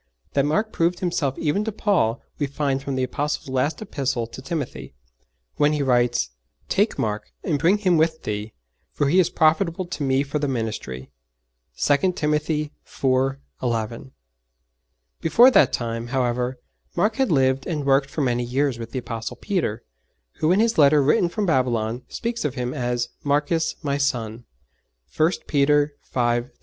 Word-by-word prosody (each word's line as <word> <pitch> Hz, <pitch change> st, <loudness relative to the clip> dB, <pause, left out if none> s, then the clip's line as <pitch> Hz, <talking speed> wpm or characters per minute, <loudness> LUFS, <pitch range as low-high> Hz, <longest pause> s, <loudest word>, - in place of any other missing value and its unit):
That 140 Hz, 0 st, +2 dB
Mark 210 Hz, +8 st, 0 dB
proved 170 Hz, +1 st, +1 dB
himself 155 Hz, -7 st, -1 dB
even 165 Hz, +7 st, 0 dB
to 220 Hz, -, -2 dB
Paul 180 Hz, -, +1 dB, 0.2 s
we 145 Hz, -, 0 dB
find 140 Hz, -1 st, -1 dB
from 140 Hz, -1 st, -3 dB
the 130 Hz, -, 0 dB
Apostle's 145 Hz, +2 st, -2 dB
last 145 Hz, +8 st, -1 dB
Epistle 135 Hz, -, -2 dB
to 115 Hz, +3 st, -10 dB
Timothy, 140 Hz, 0 st, -5 dB, 0.6 s
when 145 Hz, +1 st, +3 dB
he 150 Hz, -1 st, 0 dB
writes: 120 Hz, -, +2 dB, 0.4 s
'Take -, -, +1 dB
Mark, 105 Hz, -1 st, -2 dB
and 150 Hz, -5 st, 0 dB
bring 175 Hz, +8 st, +4 dB
him 185 Hz, -5 st, +2 dB
with 160 Hz, 0 st, +1 dB
thee: 105 Hz, +1 st, -4 dB, 0.4 s
for 145 Hz, -, 0 dB
he 180 Hz, +5 st, +4 dB
is 175 Hz, -2 st, +4 dB
profitable 170 Hz, +2 st, +2 dB
to 175 Hz, -3 st, -6 dB
me 135 Hz, 0 st, +2 dB
for 145 Hz, +2 st, -3 dB
the 145 Hz, -, 0 dB
ministry.' 110 Hz, -, -4 dB, 0.7 s
(2 165 Hz, +6 st, +2 dB
Timothy 150 Hz, -1 st, -1 dB
iv. 135 Hz, 0 st, 0 dB, 0.3 s
11.) 115 Hz, +1 st, -2 dB, 1.1 s
Before 235 Hz, +10 st, +6 dB
that -, -, +5 dB
time, 115 Hz, 0 st, -3 dB
however, 125 Hz, 0 st, -1 dB, 0.4 s
Mark 215 Hz, +1 st, +1 dB
had 265 Hz, -6 st, +1 dB
lived 135 Hz, -2 st, +2 dB
and 150 Hz, -5 st, -2 dB
worked 135 Hz, 0 st, +3 dB
for 150 Hz, -, -3 dB
many 125 Hz, -2 st, +1 dB
years 130 Hz, 0 st, 0 dB
with 115 Hz, 0 st, -7 dB
the -, -, -2 dB
Apostle 115 Hz, -2 st, -5 dB
Peter, 175 Hz, -, -2 dB, 0.6 s
who 155 Hz, -, +2 dB
in 190 Hz, -, +4 dB
his 225 Hz, -4 st, +2 dB
letter 145 Hz, 0 st, +6 dB
written 150 Hz, +5 st, +3 dB
from 210 Hz, +3 st, -2 dB
Babylon 125 Hz, -, +1 dB
speaks 235 Hz, 0 st, -3 dB
of 145 Hz, -3 st, -2 dB
him 125 Hz, -1 st, -2 dB
as 120 Hz, -1 st, -1 dB
'Marcus 150 Hz, +3 st, +1 dB
my 140 Hz, -1 st, -1 dB
son.' 120 Hz, -4 st, -2 dB, 0.7 s
(1 160 Hz, +2 st, +3 dB
Peter 145 Hz, 0 st, +3 dB
v. -, -, -31 dB, 0.4 s
13.) -, -, -27 dB
140 Hz, 165 wpm, -23 LUFS, 125-160 Hz, 1.1 s, Before